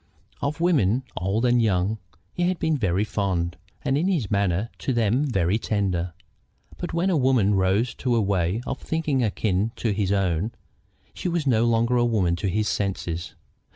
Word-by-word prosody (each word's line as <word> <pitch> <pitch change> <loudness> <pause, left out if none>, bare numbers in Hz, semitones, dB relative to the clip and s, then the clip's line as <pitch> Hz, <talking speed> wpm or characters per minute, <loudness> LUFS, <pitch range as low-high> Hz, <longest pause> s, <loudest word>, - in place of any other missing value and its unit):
Of 145 +3 -2
women, 135 - +2
old 100 +6 0
and 120 -1 +4
young, 105 0 +1 0.3
he 175 0 0
had 185 0 0
been 160 -1 +1
very 100 -6 +1
fond, 90 -5 -1 0.3
and 135 - +1
in 175 - +1
his 155 - 0
manner 100 +2 +1
to 135 - -1
them 120 +4 +2
very 95 -4 +1
tender; 95 -6 -1 0.7
but 175 - -4
when 175 +3 +1
a - - +2
woman 125 -8 +3
rose 95 +5 +2
to 125 -2 0
a - - +3
way 95 +1 0
of 135 - -4
thinking 155 -5 -1
akin 105 -1 0
to 115 - -1
his 100 -1 0
own, 95 +1 0 0.6
she 180 - -3
was 170 -3 -1
no 120 -4 +3
longer 115 +1 +2
a 120 - +3
woman 100 -7 +1
to 95 - -2
his 105 +3 0
senses. 90 -4 -2
110 Hz, 180 wpm, -24 LUFS, 95-130 Hz, 0.7 s, and